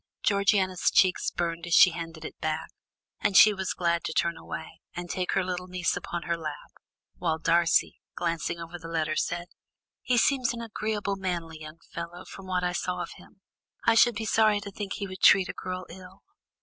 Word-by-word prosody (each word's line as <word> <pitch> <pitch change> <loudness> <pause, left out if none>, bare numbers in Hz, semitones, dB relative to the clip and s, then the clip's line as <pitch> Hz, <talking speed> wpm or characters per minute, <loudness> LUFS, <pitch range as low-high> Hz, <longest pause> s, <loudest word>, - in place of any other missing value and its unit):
Georgiana's 200 -2 +2
cheeks 185 -2 +3
burned 170 0 -3
as 175 - +3
she 180 - +8
handed 165 -1 -7
it - - -9
back, 155 0 -2 0.5
and 205 -2 +2
she 215 - +9
was 190 -1 -3
glad 170 -1 0
to - - -2
turn 170 +1 +1
away, 160 - -8
and 175 0 -5
take 185 -1 -2
her 190 - +2
little 180 0 -4
niece 180 -1 -1
upon 175 0 -5
her 170 - -1
lap, 155 -3 -7 0.5
while 160 -2 0
Darcy, 165 +1 +2
glancing 170 0 -2
over 170 +1 -8
the 165 - -9
letter, 160 -2 -1
said: 175 +2 -1 0.6
"He 250 - +1
seems 250 -1 +2
an 235 - -6
agreeable, 215 -2 -2
manly 170 -4 -4
young 155 +1 -10
fellow, 170 +2 -7
from 195 -1 -11
what 180 -1 0
I 180 0 0
saw 180 0 -2
of - - -8
him; 195 - -18 0.4
I 230 - +6
should 235 0 +5
be 220 +1 -3
sorry 215 -1 +3
to 200 - -8
think 200 0 -5
he 200 - -4
would 190 -1 -9
treat 195 -2 +6
a - - -3
girl 185 0 -5
ill." 185 +2 -13
180 Hz, 200 wpm, -27 LUFS, 170-195 Hz, 0.6 s, she